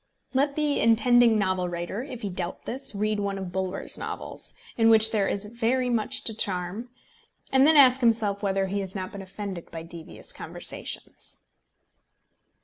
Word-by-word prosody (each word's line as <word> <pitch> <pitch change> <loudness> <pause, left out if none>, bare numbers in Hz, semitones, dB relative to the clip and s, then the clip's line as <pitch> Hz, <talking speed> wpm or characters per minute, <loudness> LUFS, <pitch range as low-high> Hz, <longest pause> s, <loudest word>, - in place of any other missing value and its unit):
Let 280 +2 +1
the 300 -2 +1
intending 235 0 +5
novel 185 -3 0
writer, 175 +5 -4
if 255 -3 -8
he 200 - -2
doubt 180 0 -4
this, 265 -2 -2
read 210 +1 0
one 200 -1 -2
of 190 -2 -5
Bulwer's 190 +1 -2
novels, - - -5 0.2
in 225 -1 +4
which 220 0 +7
there 205 -3 +1
is 200 +1 -1
very 240 +3 0
much 235 +3 0
to 225 - 0
charm, 195 +3 -2 0.6
and 265 +1 +5
then 315 -1 +5
ask 265 -2 +7
himself 220 -4 +2
whether 195 -1 0
he 200 +1 -2
has 190 0 -5
not 185 -1 -4
been 200 - -7
offended 195 -2 -7
by 165 -1 -7
devious 165 -1 -9
conversations. - - -3
210 Hz, 165 wpm, -26 LUFS, 190-240 Hz, 0.6 s, which